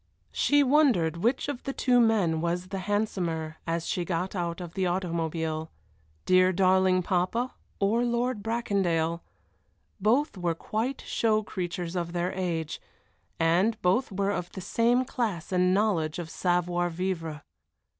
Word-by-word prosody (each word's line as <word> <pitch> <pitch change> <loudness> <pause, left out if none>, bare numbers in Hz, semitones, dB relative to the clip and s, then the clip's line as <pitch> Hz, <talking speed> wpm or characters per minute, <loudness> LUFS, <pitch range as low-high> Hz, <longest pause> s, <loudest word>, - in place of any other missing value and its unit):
She 290 0 +3
wondered 255 - +3
which 235 +11 0
of 285 -4 -4
the 275 - -4
two 250 -2 +3
men 200 -9 +3
was 175 +2 -2
the 195 0 -3
handsomer 170 -7 -1
as 165 0 -1
she 180 - -1
got 180 +3 -2
out 170 -1 -2
of 175 -2 -7
the 190 -1 0
automobile 165 -3 -2 0.6
dear, 185 0 +5
darling 185 0 +3
papa 190 +9 0 0.3
or 215 +4 +2
Lord 240 -1 0
Bracondale; 190 -8 0 0.8
both 220 +2 +1
were 170 -2 0
quite 225 +10 -3
show 215 -1 +1
creatures 175 -2 -4
of 170 -1 -2
their 175 +1 -1
age, 170 -4 -3 0.6
and 180 +7 +2
both 195 +8 +2
were 200 +1 0
of 180 -3 -3
the - - -6
same 240 +6 +2
class 215 -11 -3
and 180 0 +3
knowledge 185 -6 +1
of 165 -2 -6
savoir 175 -1 0
vivre. 165 -4 -3
185 Hz, 145 wpm, -28 LUFS, 170-220 Hz, 0.8 s, dear